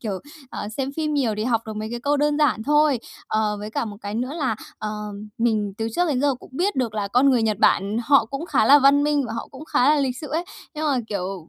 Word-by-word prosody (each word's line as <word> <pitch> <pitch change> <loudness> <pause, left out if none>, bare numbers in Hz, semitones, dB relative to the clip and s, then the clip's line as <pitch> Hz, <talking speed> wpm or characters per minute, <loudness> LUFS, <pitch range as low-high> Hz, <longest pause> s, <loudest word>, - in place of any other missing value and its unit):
kiểu, 200 -5 -3 0.3
ờ, 205 - -5
xem 270 0 -2
phim 305 -1 -1
nhiều 245 -7 +1
thì 215 - -2
học 230 -2 +1
được 220 -1 -6
mấy 215 +1 -4
cái 240 - -4
câu 285 +4 +1
đơn 295 +1 +1
giản 275 -7 +2
thôi. 295 0 +3 0.3
Ờ, 215 -1 0
với 210 +1 -6
cả 230 - -1
một 205 -2 -7
cái 205 -1 -5
nữa 250 +4 -2
là, 260 -8 0 0.2
ờ, 215 - -4 0.5
mình 215 -3 +1
từ 225 - -1
trước 355 0 +2
đến 260 -4 0
giờ 285 -1 +2
cũng - - -15
biết 360 +7 0
được 240 -5 -1
là 205 -2 -2
con 265 +5 +4
người 245 -3 +3
Nhật 215 -2 0
Bản 200 +1 +3
họ 275 -3 +5
cũng 275 +8 -6
khá - - +2
là 290 +1 +8
văn 280 +1 +5
minh 295 -2 +1
và 220 - -5
họ 230 - -5
cũng 275 +3 -10
khá 260 -4 +2
là 295 - +1
lịch 260 -2 -1
sự 300 - -7
ấy. 325 +4 -1 0.3
Nhưng 310 +1 -3
mà, 280 -3 +2
kiểu, 190 -4 -4
250 Hz, 270 wpm, -23 LUFS, 215-290 Hz, 0.5 s, là